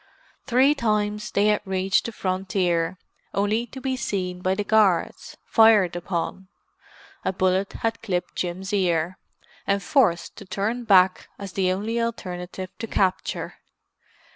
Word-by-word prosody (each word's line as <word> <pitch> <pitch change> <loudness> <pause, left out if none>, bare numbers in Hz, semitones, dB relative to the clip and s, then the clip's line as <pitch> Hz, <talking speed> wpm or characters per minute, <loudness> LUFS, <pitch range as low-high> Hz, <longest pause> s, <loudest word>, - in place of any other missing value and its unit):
Three 265 +3 +4
times 210 -5 -1
they 200 - +2
had 210 - +2
reached 190 +1 +1
the - - -4
frontier; 185 -3 -1 0.4
only 210 +4 +1
to 265 - -9
be 260 0 -2
seen 185 -7 -3
by 185 +1 +1
the 205 - -1
guards, 205 -5 +1
fired 215 -6 +5
upon—a 185 +2 -6
bullet 185 +1 +1
had 225 0 -2
clipped 180 -5 -3
Jim's 185 +3 -3
ear—and 185 +2 -2
forced 175 - +2
to - - -10
turn 220 +6 -2
back 185 -3 +4
as 195 -3 -8
the 185 -2 +1
only 220 +5 -1
alternative 185 -5 -5
to 225 - -4
capture. 190 -3 -1
195 Hz, 130 wpm, -24 LUFS, 185-220 Hz, 0.4 s, fired